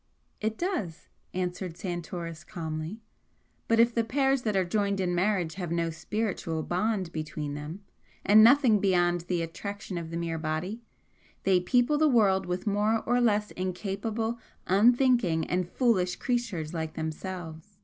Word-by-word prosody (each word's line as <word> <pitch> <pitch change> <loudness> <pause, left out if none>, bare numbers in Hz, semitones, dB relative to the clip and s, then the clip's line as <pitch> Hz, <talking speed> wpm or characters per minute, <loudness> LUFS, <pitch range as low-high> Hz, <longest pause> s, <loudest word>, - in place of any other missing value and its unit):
"It 220 +1 -2
does," 220 - -3 0.2
answered 180 -1 -3
Santoris, 175 -2 -5
calmly 165 +2 -5 0.7
"But 230 0 +3
if 235 +1 +5
the 230 - +2
pairs 270 +2 +1
that 215 -4 -1
are 190 -1 +2
joined 200 +1 0
in 180 -2 0
marriage 180 -2 +1
have 175 -2 -4
no 170 -1 0
spiritual 170 -2 -3
bond 185 0 -1
between 155 -2 -4
them 150 +7 -7 0.4
and 215 +2 +8
nothing 240 -3 +6
beyond 175 -3 +2
the 175 0 -1
attraction 195 +2 -5
of 165 -1 -7
the 165 - -4
mere 165 -1 -2
body 160 +8 -3 0.6
they 190 -2 +4
people 245 +10 +2
the 310 - +5
world 195 -7 +3
with 180 +3 -3
more 210 +2 +1
or 245 +1 +2
less 210 -3 +2
incapable, 205 +5 -3 0.3
unthinking 225 -5 +3
and 180 -1 -1
foolish 190 -8 +1
creatures 230 - -2
like 160 -2 -4
themselves. 165 +3 -6
185 Hz, 150 wpm, -28 LUFS, 170-220 Hz, 0.7 s, and